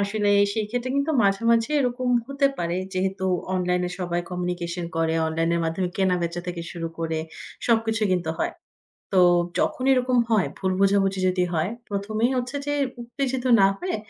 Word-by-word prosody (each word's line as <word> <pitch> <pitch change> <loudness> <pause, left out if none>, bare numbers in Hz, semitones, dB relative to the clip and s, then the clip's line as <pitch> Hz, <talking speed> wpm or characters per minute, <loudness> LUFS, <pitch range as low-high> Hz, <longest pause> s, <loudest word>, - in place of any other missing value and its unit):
আসেনাই 205 0 +2 0.2
সেই 220 - 0
ক্ষেত্রে 245 +2 -2
কিন্তু 280 +3 +1
মাঝামাঝি 230 +4 +2
এরকম 250 -1 -1 0.2
হতে 275 0 +2
পারে, 170 0 -1 0.2
যেহেতু 190 +1 -1 0.3
অনলাইন 180 -1 0
এ - - -8
সবাই 175 -1 -1
কমিউনিকেশন 180 -1 -3
করে, 165 0 +1
অনলাইনের 165 +1 0
মাধ্যমে 165 +3 -1
কেনা-বেচা 175 -3 0
থেকে 175 -1 -4
শুরু 165 -1 -4
করে 160 -1 -2 0.5
সবকিছু 225 -1 +1
কিন্তু 175 -3 0
হয়। - - -1 0.6
তো 190 - +5 0.4
যখন 255 - 0
এরকম 255 -1 +2
হয় 215 -5 +3
ভুল 190 -1 -1
বোঝাবুঝি 195 -1 +2
যদি 185 0 +1
হয়, 165 +2 0 0.2
প্রথমেই 215 +4 0
হচ্ছে 250 +2 -3
যে 290 - -1 0.3
উত্তেজিত 260 +1 -3 0.2
না 195 - +7
হয়ে, 365 - -2
195 Hz, 160 wpm, -24 LUFS, 175-235 Hz, 0.6 s, না